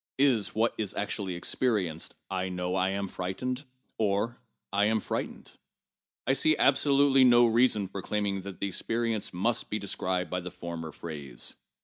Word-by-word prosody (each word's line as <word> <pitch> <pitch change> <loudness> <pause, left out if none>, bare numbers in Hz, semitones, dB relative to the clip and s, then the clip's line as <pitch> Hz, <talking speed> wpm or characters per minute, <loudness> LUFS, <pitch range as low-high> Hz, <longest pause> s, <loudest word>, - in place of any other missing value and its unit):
Is 125 -8 +2
what 115 +2 +2
is 105 -2 -1
actually 100 -2 -2
experienced, 90 -4 -1
I 95 -1 -2
know 90 0 -2
I 95 0 +2
am 100 +1 -2
frightened, 125 +10 -3 0.3
or 110 +3 +1 0.3
I 100 +1 +4
am 110 +1 +3
f 105 - -7
rightened? - - -3 0.7
I 135 - +3
see 155 +3 +3
absolutely 140 -1 +5
no 120 -1 +7
reason 115 -3 +3
for 95 +1 -6
claiming 100 -1 -1
that 95 -1 -8
the - - -1
experience 115 +2 -1
must 110 +6 0
be 105 - -1
described 95 -3 -2
by 90 - 0
the 90 0 -6
former 85 -3 -6
phrase. 75 -6 -6
100 Hz, 160 wpm, -29 LUFS, 90-120 Hz, 0.7 s, no